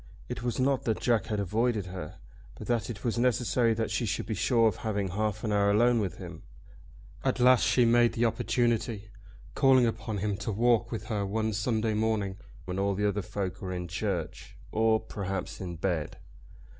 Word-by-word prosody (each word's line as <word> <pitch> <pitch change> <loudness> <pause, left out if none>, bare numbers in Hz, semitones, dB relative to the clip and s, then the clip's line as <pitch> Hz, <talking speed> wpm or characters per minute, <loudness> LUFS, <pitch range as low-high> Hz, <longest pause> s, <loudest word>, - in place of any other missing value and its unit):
It - - -5
was 120 0 -2
not 135 0 +1
that 110 -2 0
Jack 115 -3 +1
had 105 -2 -2
avoided 110 +2 0
her, 90 -4 -7 0.4
but - - -9
that 120 -1 -1
it 105 -4 -7
was 120 -1 -1
necessary 120 -1 +2
that 110 -1 -2
she 110 +2 -1
should - - -2
be 110 - -3
sure 115 +3 +3
of 105 - 0
having 100 -3 -2
half 105 +2 -2
an 110 - -1
hour 100 0 +3
alone 120 +3 +4
with 95 -6 -3
him. - - -9 0.8
At - - 0
last 125 0 +6
she 125 - +4
made 120 0 +4
the 120 - +1
opportunity, 115 -2 0 0.4
calling 130 -2 +5
upon 110 -1 -2
him 100 0 -1
to 110 +2 -3
walk 115 +2 +2
with 115 - -4
her 105 -4 -2
one 110 +2 -1
Sunday 110 +1 0
morning 105 -3 0 0.3
when 90 +1 -3
all 100 0 0
other 105 0 0
folk 95 0 -4
were 95 -1 -4
in 90 -1 -4
church 90 -2 -4
or, 110 0 +3
perhaps, 100 -2 -5
in 90 -2 -5
bed. 80 -2 -2
110 Hz, 190 wpm, -29 LUFS, 100-120 Hz, 0.8 s, last